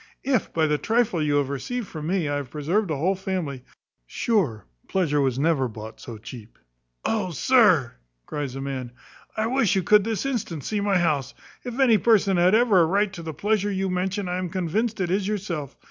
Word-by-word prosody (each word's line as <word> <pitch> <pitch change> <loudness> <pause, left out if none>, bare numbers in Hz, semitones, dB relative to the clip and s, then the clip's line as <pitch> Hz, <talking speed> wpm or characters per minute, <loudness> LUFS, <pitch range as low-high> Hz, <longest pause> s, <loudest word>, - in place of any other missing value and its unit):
"If, 260 -6 0
by 160 -1 +1
the 150 -1 +1
trifle 225 -7 +1
you 150 -1 +1
have 145 -2 +1
received 230 - -3
from 155 -3 -6
me, 180 -3 0
I 145 0 -1
have 140 -3 -5
preserved 170 - -1
a 155 - 0
whole 180 +7 +1
family, 185 -9 -4 0.4
sure 160 - 0 0.2
pleasure 155 -6 +1
was 130 -2 0
never 140 -2 +2
bought 110 -1 -9
so 115 -3 -8
cheap." 115 0 -11 0.5
"Oh, 210 -4 0
sir!" 180 - +4 0.3
cries 140 - -4
the 135 - -5
man, 130 -3 -5 0.4
"I 215 - +1
wish 235 -4 +2
you 190 - +1
could 210 +3 +5
this 225 +3 -2
instant 200 - -3
see 210 -2 -2
my 200 -2 +2
house. 145 -6 0 0.3
If 245 +1 -6
any 235 -6 +5
person 200 -4 +3
had 180 +4 +4
ever 220 -6 +5
a - - +5
right 200 +3 +1
to 175 - -7
the 160 -2 -6
pleasure 205 +4 0
you 190 -1 -1
mention, 190 +2 -1
I 180 +1 -2
am 185 -1 -3
convinced 195 +6 -1
it 180 -2 -1
is 195 +1 0
yourself. 180 -9 -4
180 Hz, 205 wpm, -24 LUFS, 145-210 Hz, 0.5 s, could